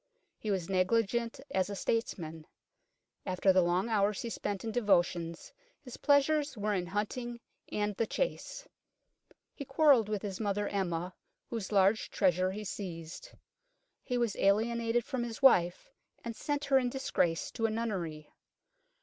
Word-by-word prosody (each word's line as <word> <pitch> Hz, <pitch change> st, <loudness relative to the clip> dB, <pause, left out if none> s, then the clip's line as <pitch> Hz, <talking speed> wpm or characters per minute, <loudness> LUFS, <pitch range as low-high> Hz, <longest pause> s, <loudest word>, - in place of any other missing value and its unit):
He 215 Hz, -, -4 dB
was 190 Hz, -4 st, -1 dB
negligent 230 Hz, +6 st, +1 dB
as 190 Hz, 0 st, +1 dB
a 200 Hz, -, -4 dB
statesman. 165 Hz, -8 st, -3 dB, 0.8 s
After 185 Hz, 0 st, +2 dB
the 185 Hz, -, +5 dB
long 175 Hz, +4 st, +1 dB
hours 210 Hz, -2 st, +1 dB
he 235 Hz, -, -4 dB
spent 200 Hz, -3 st, -3 dB
in 225 Hz, -, -3 dB
devotions, 175 Hz, -6 st, +1 dB, 0.3 s
his 250 Hz, -3 st, -9 dB
pleasures 290 Hz, -1 st, +2 dB
were 210 Hz, 0 st, 0 dB
in 180 Hz, -3 st, -1 dB
hunting 235 Hz, +5 st, -3 dB, 0.3 s
and 210 Hz, -1 st, -1 dB
the 230 Hz, -, 0 dB
chase; -, -, -3 dB, 0.9 s
he -, -, -7 dB
quarrelled 270 Hz, -5 st, +4 dB
with 210 Hz, -1 st, -2 dB
his 195 Hz, -2 st, -4 dB
mother 205 Hz, -1 st, -1 dB
Emma, 180 Hz, -2 st, -2 dB, 0.4 s
whose 225 Hz, -4 st, -4 dB
large 200 Hz, +2 st, +3 dB
treasure 185 Hz, -1 st, +2 dB
he 210 Hz, +2 st, -5 dB
seized; 180 Hz, -, -6 dB, 0.7 s
he 250 Hz, -, -2 dB
was 235 Hz, -4 st, 0 dB
alienated 230 Hz, +3 st, +2 dB
from 255 Hz, -, -3 dB
his 235 Hz, +2 st, -6 dB
wife, 180 Hz, -, +4 dB, 0.3 s
and 235 Hz, -1 st, -5 dB
sent 290 Hz, +3 st, -2 dB
her 270 Hz, -1 st, +4 dB
in 250 Hz, -1 st, 0 dB
disgrace 180 Hz, -10 st, 0 dB
to 225 Hz, -2 st, 0 dB
a -, -, -2 dB
nunnery. 185 Hz, -9 st, -4 dB
210 Hz, 150 wpm, -31 LUFS, 185-235 Hz, 0.9 s, the